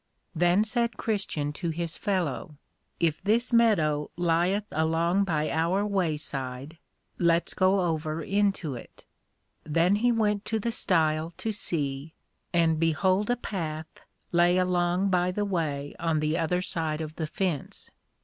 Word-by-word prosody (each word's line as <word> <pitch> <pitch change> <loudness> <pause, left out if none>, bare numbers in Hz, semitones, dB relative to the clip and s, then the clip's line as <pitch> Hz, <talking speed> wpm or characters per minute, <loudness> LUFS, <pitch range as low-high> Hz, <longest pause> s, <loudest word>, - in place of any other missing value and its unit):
Then 175 +4 +3
said 235 +1 -1
Christian 195 -9 -2
to 170 +3 -3
his 165 0 -2
fellow, 170 -7 -2 0.4
If 165 -3 +1
this 230 +5 +1
Meadow 160 -11 +3
lieth 175 +4 +1
along 165 +5 +1
by 155 -4 0
our 170 +5 +1
way 185 -7 0
side, 135 +2 -6 0.4
let's 170 -1 +2
go 190 +1 +3
over 160 -2 -1
into 195 -6 0
it. 120 - -11 0.6
Then 170 +6 +2
he 240 +3 +3
went 210 -3 +1
to 225 - -1
the 230 +2 -1
Stile 160 -7 +1
to 225 - -2
see, 150 -7 -3 0.4
and 165 -2 +2
behold 185 +6 +2
a 245 - +3
Path 160 -9 -5 0.3
lay 175 +1 +4
along 180 +1 +1
by 180 0 +2
the 205 +3 -1
way 150 -7 -2
on 165 -2 +1
the 155 +1 0
other 180 +2 0
side 160 -4 -2
of 155 0 -6
the 160 - -2
fence. 170 -4 -3
170 Hz, 145 wpm, -27 LUFS, 155-195 Hz, 0.6 s, lay